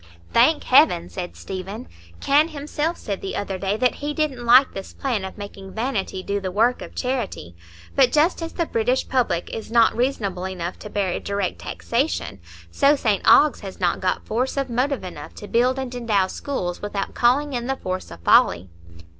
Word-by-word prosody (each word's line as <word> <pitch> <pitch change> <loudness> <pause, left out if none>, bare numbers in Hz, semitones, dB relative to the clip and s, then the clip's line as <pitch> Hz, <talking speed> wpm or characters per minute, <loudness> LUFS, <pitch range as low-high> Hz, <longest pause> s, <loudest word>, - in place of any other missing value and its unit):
"Thank - - +4
Heaven!" 85 +1 +4
said 175 - -6
Stephen. 195 +5 -7 0.3
"Kenn 290 +3 +4
himself 300 +2 -3
said 200 -2 -5
the 195 - -4
other 195 -2 -3
day 195 +2 -1
that 250 +2 +2
he 290 0 -4
didn't 285 -6 -1
like 255 +3 +6
this 195 - -8
plan 245 -8 -2
of 190 - -7
making 195 -2 -9
vanity 220 -5 -2
do 200 +1 -1
the 190 - -3
work 230 +6 +2
of - - -9
charity; 245 - -3 0.4
but 265 -2 +5
just 315 +4 +2
as 330 0 -5
the 335 - -1
British 250 0 0
public 240 -10 0
is 225 - -6
not 230 -1 +4
reasonable 205 -8 -1
enough 180 -1 -5
to 210 - -8
bear 195 -3 -1
direct 200 -2 -3
taxation, 235 - -2 0.3
so 280 - +4
St 215 -7 0
Ogg's 300 -3 +6
has 195 -2 -9
not 175 -2 +1
got 185 -1 -1
force 250 +5 -1
of 275 -3 -1
motive 260 +2 0
enough 175 -5 -8
to 205 - -9
build 250 +4 +2
and 260 -2 -4
endow 225 -6 +1
schools 185 -4 -4
without 205 -1 -3
calling 275 +4 +2
in 240 -1 -3
the 270 0 -1
force 185 -3 -4
of 85 -1 -11
folly." 85 +1 +4
225 Hz, 190 wpm, -23 LUFS, 190-265 Hz, 0.4 s, like